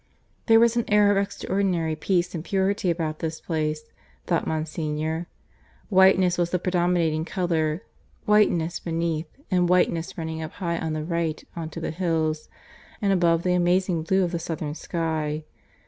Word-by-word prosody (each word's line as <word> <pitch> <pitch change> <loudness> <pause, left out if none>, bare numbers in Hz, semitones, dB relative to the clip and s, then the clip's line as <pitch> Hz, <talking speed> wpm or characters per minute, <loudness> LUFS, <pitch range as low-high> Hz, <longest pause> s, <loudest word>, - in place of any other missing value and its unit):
There 225 -1 +7
was 235 0 +4
an 235 - +1
air 205 -1 +5
of 200 - +2
extraordinary 190 -4 0
peace 175 +3 0
and 165 -3 -4
purity 195 0 0
about 160 -2 -2
this 160 -1 -3
place, 155 -2 -2 0.4
thought 170 -2 0
Monsignor. 155 +1 -2 0.6
Whiteness 190 -2 +5
was 175 -1 +1
the 180 - +1
predominating 175 -3 +1
colour 165 -1 -1 0.4
whiteness 175 -6 +3
beneath, 165 -1 -2 0.2
and 180 -1 +3
whiteness 180 0 +1
running 160 -1 -4
up 155 - -6
high 170 -3 -2
on 160 -1 -2
the 155 0 -3
right 170 -2 -2
on 165 -2 -4
to 165 - -7
the 165 - -3
hills 160 -3 -1 0.5
and 200 -3 +2
above 170 -2 +3
the 180 - +2
amazing 180 -1 +2
blue 190 +4 +2
of 175 - -1
the 170 - -2
southern 160 -3 -4
sky. 155 -2 -2
170 Hz, 160 wpm, -25 LUFS, 160-185 Hz, 0.6 s, There